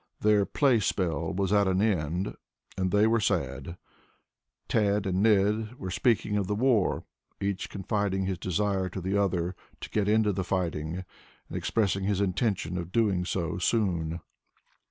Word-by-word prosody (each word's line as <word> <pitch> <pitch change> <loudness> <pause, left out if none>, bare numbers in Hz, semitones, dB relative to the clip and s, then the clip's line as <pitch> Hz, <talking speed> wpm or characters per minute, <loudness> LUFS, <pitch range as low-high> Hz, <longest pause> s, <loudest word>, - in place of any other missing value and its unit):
Their 105 -2 +4
playspell 95 - +1
was 100 +1 0
at 100 -1 +4
an 95 0 +2
end 90 -4 0 0.4
and 95 -1 0
they 105 +2 +4
were 115 +1 +3
sad. 85 -5 -2 0.9
Tad 105 -2 +1
and 95 0 0
Ned 105 +2 +2
were 95 -6 -6
speaking 110 -1 +1
of 100 -2 -1
the 105 - 0
war, 115 -4 +2 0.4
each 100 0 -2
confiding 100 -1 -1
his 95 -2 -2
desire 95 +1 0
to 95 - -5
the 95 +2 -2
other, 90 -3 0 0.2
to - - -7
get 105 -1 +1
into 105 -1 +3
the 95 0 -1
fight, 90 -2 -1
and 80 +5 -5 0.5
expressing 100 -3 0
his 100 -1 +1
intention 95 -2 0
of 85 0 -6
doing 100 -6 +1
so 85 -2 -2
soon. 85 -5 0
95 Hz, 155 wpm, -28 LUFS, 90-105 Hz, 0.9 s, Their